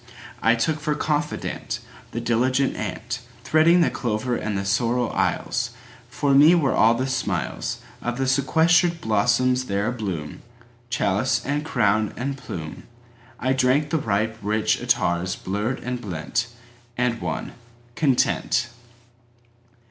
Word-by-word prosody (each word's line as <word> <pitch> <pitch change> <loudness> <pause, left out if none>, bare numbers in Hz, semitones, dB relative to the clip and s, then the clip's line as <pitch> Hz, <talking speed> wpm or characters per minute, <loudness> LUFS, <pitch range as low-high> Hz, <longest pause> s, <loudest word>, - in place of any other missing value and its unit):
I 115 +1 +4
took 150 +7 0
for 150 0 -1
confidantThe 150 0 -2 0.4
diligent 130 +3 +2
antThreading 125 +9 +1
the - - +1
clover 120 +1 -1
and 105 -3 -2
the 100 - -3
sorrel 115 +4 +1
aisles; - - 0 0.4
For 140 -1 0
me 150 +5 +7
were 145 -6 +2
all 115 +2 +5
the 130 +2 -1
smilesOf 125 - -2 0.4
the 135 - 0
sequestered 160 +6 +3
blossoms 125 +3 +2
there 100 -2 -1
abloom—Chalice 115 +3 -3
and 145 +1 -1
crown 110 -8 +1
and 135 +2 -2
plume;I 120 +5 -6
drank 135 +3 +2
the 160 - +2
ripe 110 -1 -1
rich 105 +1 +1
attars 95 -7 +1
blurred 105 +7 -2
and 125 -1 -3
blent, 100 +4 -2 0.5
And 125 -1 0
won—Content! 120 0 -1
120 Hz, 110 wpm, -23 LUFS, 110-135 Hz, 0.5 s, me